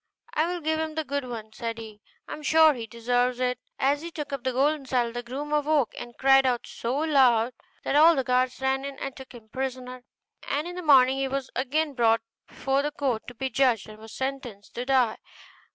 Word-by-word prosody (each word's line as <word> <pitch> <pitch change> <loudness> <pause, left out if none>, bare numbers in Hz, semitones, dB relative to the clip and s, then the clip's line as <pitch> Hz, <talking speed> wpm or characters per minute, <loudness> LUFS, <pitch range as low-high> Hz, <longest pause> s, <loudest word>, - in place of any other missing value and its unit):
'I 315 +2 +1
will 355 0 -3
give 315 0 0
him 315 -1 -3
the 315 - -1
good 285 -1 -3
one,' 220 -3 -7
said 230 0 -4
he; 215 -2 -10 0.3
'I - - -6
am 305 - -8
sure 315 +1 +5
he 235 -4 -6
deserves 245 +2 0
it.' 250 0 0 0.2
As 280 +2 +1
he 335 - -6
took 300 -4 -6
up 275 -3 -4
the 260 - 0
golden 275 +2 +1
saddle 245 -3 +1
the 240 - -3
groom 275 +5 -5
awoke 295 -3 +2
and 240 -1 -9
cried 270 0 +5
out 250 -2 0
so 240 +4 -3
loud, 255 -6 +3 0.3
that - - -1
all 325 +3 +7
the 265 - 0
guards 255 0 +1
ran 265 0 0
in 280 -1 -6
and 275 -1 -5
took 265 -1 -11
him 225 -3 -14
prisoner, 255 0 -5 0.4
and 295 +4 -2
in 355 - -7
the 360 - -5
morning 270 -4 +5
he 270 - 0
was 270 0 -4
again 290 +4 0
brought 230 -3 +3 0.3
before 270 +1 -1
the 295 - -1
court 270 -7 -2
to 245 - -9
be 265 +3 -3
judged, 245 -3 +2
and 215 0 -12
was 220 0 -12
sentenced 260 -6 -5
to 245 - -4
die. 255 -4 +3
265 Hz, 225 wpm, -26 LUFS, 240-285 Hz, 0.4 s, all